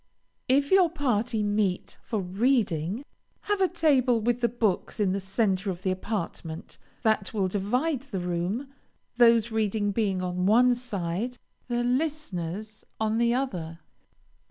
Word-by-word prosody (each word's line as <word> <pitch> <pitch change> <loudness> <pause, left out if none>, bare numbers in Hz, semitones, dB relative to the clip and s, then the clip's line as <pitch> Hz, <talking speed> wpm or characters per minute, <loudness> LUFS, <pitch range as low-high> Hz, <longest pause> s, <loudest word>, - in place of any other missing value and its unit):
If 280 +2 +2
your 375 -3 +6
party 240 -8 0
meet 205 -3 -1
for 220 -4 -2
reading, 200 - 0 0.4
have 410 -1 -1
a 375 - +5
table 275 -9 +3
with 240 +2 0
the 235 - +3
books 220 -3 -1
in 200 -3 +2
the 195 - 0
centre 195 0 0
of 180 0 -5
the 190 - +1
apartment, 185 -4 -5 0.2
that 220 -2 +1
will 195 -3 +1
divide 245 - 0
the 260 -9 -5
room, 180 +10 -2 0.4
those 235 -1 +5
reading 215 -1 0
being 195 -3 0
on 180 0 -1
one 245 +4 +5
side, 230 -1 -3 0.3
the 240 -1 0
listeners 220 - -2 0.2
on 220 +1 +1
the 235 0 +3
other. 175 -12 -3
220 Hz, 140 wpm, -27 LUFS, 190-250 Hz, 0.4 s, your